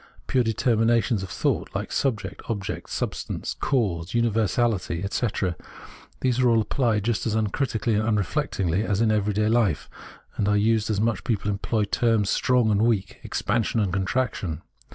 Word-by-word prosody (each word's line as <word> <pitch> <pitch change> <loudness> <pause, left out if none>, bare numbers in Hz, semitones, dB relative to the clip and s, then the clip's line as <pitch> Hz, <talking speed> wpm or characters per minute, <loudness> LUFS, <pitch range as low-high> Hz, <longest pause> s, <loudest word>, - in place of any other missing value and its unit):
pure 125 - +2
determinations 115 -1 +2
of 95 - -6
thought - - -1
— - - -21
like - - -3
subject, 110 -8 -1
object, 100 -4 -4
substance, - - -3
cause, 95 -9 0
univer 115 -3 +2
sality, 100 -6 0
etc. 100 -3 -1 0.3
— - - -20
these 130 -1 +1
are 130 - +3
apphed 115 -1 +2
just 115 +1 0
as 110 - 0
uncritically 110 +1 0
and 105 - +2
unreflectingly 95 -3 0
as 105 -3 0
in 115 -1 +3
every 105 -1 +1
day 105 +1 +1
life, 110 -9 +1 0.6
are 105 +1 +2
used 110 +1 +2
much 115 +1 +1
as - - -12
people 105 -3 -1
employ 105 +2 -1
the - - +2
terms 110 -1 +1
strong 125 -3 +2
and 105 0 +2
weak, 110 -4 0
expansion 115 +2 0
and 100 -4 0
contraction. 95 - -1
110 Hz, 165 wpm, -25 LUFS, 100-115 Hz, 0.6 s, are